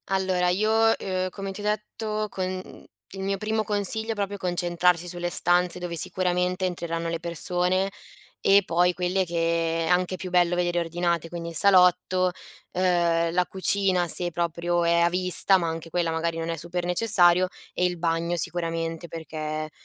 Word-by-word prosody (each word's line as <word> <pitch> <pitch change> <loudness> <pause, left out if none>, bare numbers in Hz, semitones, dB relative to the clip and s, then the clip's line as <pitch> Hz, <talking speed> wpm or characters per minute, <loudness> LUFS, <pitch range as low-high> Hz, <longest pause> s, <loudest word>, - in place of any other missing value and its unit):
Allora 190 -2 +1
io, 220 +4 +2
ehm, 185 -1 -2
come 195 +1 -6
ti 195 - -8
ho - - -8
detto 215 0 -2
con 185 -1 -3
mh, 185 0 -9 0.3
il 195 - -9
mio 195 0 -1
primo 215 +2 -1
consiglio 215 +2 -1
è - - -3
proprio 200 -1 -3
concentrarsi 175 -1 0
sulle 175 0 -3
stanze, 175 +1 +1
dove 175 -1 -5
sicuramente 180 +1 0
entreranno 170 -2 -3
le 165 0 -3
persone 180 +3 -1 0.5
e 200 +1 +5
poi 180 +1 +2
quelle 180 +1 0
che 165 -1 0
è - - -3
anche 180 +1 +1
più 185 0 -7
bello 175 -1 +3
vedere 175 0 0
ordinate, 170 0 -1
quindi 170 -1 -6
il 165 - -9
salotto, 185 -1 +4 0.4
ehm, 170 -2 +1
la 180 +1 +1
cucina 190 -1 +1
se 175 +1 +3
proprio 170 +1 -1
è 170 0 +3
a 170 - +4
vista, 185 +2 +3
ma 170 -2 -2
anche 165 0 -5
quella 175 -1 0
magari 165 0 -2
non 165 0 -3
è 165 - -1
super 175 +2 -4
necessario 180 -2 +4 0.3
e 180 - 0
il 180 -1 -1
bagno 165 +1 0
sicuramente 165 0 -3
perché 155 -1 -5
180 Hz, 170 wpm, -25 LUFS, 170-185 Hz, 0.5 s, e